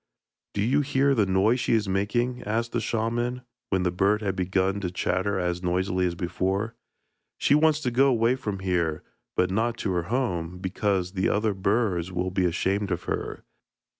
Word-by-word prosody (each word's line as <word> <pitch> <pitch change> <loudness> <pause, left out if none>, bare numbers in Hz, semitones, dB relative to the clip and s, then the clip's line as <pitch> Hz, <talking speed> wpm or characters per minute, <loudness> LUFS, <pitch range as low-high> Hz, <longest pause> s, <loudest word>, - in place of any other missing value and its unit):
'Do 100 - +1
you 135 +6 +3
hear 140 0 +2
the 110 -6 +2
noise 100 +6 +3
she 120 - +1
is 105 -2 0
making?' 120 +6 0
asked 115 +3 -2
the 120 - -1
shaman, 120 +2 -1 0.3
when 95 -2 +1
the 90 - +1
bird 100 +4 +2
had 95 -2 -1
begun 95 +1 0
to 95 -3 -2
chatter 95 +2 -1
as 90 -1 -1
noisily 90 0 0
as 85 - -3
before. 95 +5 -1 0.6
'She - - +3
wants 155 0 +4
to 125 -4 -1
go 135 +3 +4
away 120 -1 +3
from 105 -7 -4
here, 85 -4 0 0.3
but 90 0 +2
not 115 +4 0
to 100 - -2
her 90 -2 0
home, 90 -9 -1
because 95 0 -1
the 95 -1 0
other 105 0 +1
birds 95 -3 0
will 90 +1 -2
be 95 0 +1
ashamed 95 +4 0
of 90 -1 -2
her. - - -4
100 Hz, 185 wpm, -26 LUFS, 90-115 Hz, 0.6 s, wants